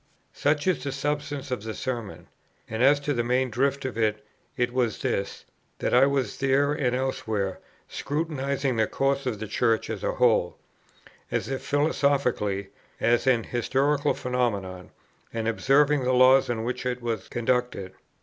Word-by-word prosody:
Such 145 0 +1
is 170 -9 +1
the 140 - -2
substance 145 0 -3
of 125 - -2
the 110 0 -6
Sermon: 120 -5 -5 0.4
and 110 +1 -4
as 140 +3 +5
to 145 0 -1
the 120 -2 0
main 125 +1 +1
drift 135 +4 0
of 125 -3 -4
it, 105 -1 0 0.3
it 120 0 0
was 125 -4 -1
this; 100 - -2 0.3
that - - -2
I 130 +3 +6
was, 135 -6 -1
there 140 +2 +2
and 125 -4 0
elsewhere, 110 -7 -2 0.3
scrutinizing 140 -4 -2
the 110 -1 +2
course 135 0 0
of 115 -4 -1
the 110 - -5
Church 115 +1 0
as 105 -4 -5
a - - 0
whole, 110 -8 +2 0.7
as - - -2
if 135 -1 -3
philosophically, 140 -9 0 0.3
as 120 +3 +2
an 120 -3 +4
historical 140 +5 +1
phenomenon, 100 -8 -2 0.4
and 115 -1 -3
observing 140 +4 +3
the 130 +1 +1
laws 130 +1 +6
on 115 -2 -1
which 125 +2 -3
it 125 -1 -3
was 115 -2 -3
conducted. 120 -5 -1
125 Hz, 160 wpm, -26 LUFS, 115-140 Hz, 0.7 s, I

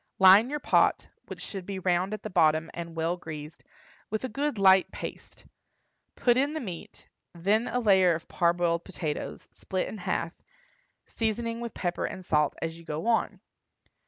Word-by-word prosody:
Line 195 +5 +7
your 295 +1 -2
pot, - - +2 0.2
which - - -8
should 195 -2 -6
be 195 +1 -5
round 185 +1 0
at 215 - -5
the 215 - -4
bottom 160 -2 +3
and 170 -1 -7
well 165 +2 -1
greased, 155 -2 -9 0.5
with 215 +3 -3
a 260 - -2
good 280 +2 -2
light 190 -1 +5
paste; - - -9 0.7
put 240 -1 +3
in 280 +3 +1
the - - -1
meat, 185 - -8 0.3
then 205 +7 +1
a 250 - -1
layer 190 -6 +4
of 165 - -8
parboiled 170 -1 +1
potatoes, 160 -5 -5
split 185 -1 -3
in 215 - -7
half, 170 -2 -2 0.7
seasoning 230 +1 -2
with 235 -1 -6
pepper 175 -1 -2
and 185 - -6
salt 150 -3 +2
as 165 0 -4
you - - -13
go 160 +3 -5
on. 230 -1 0
185 Hz, 170 wpm, -28 LUFS, 170-220 Hz, 0.7 s, Line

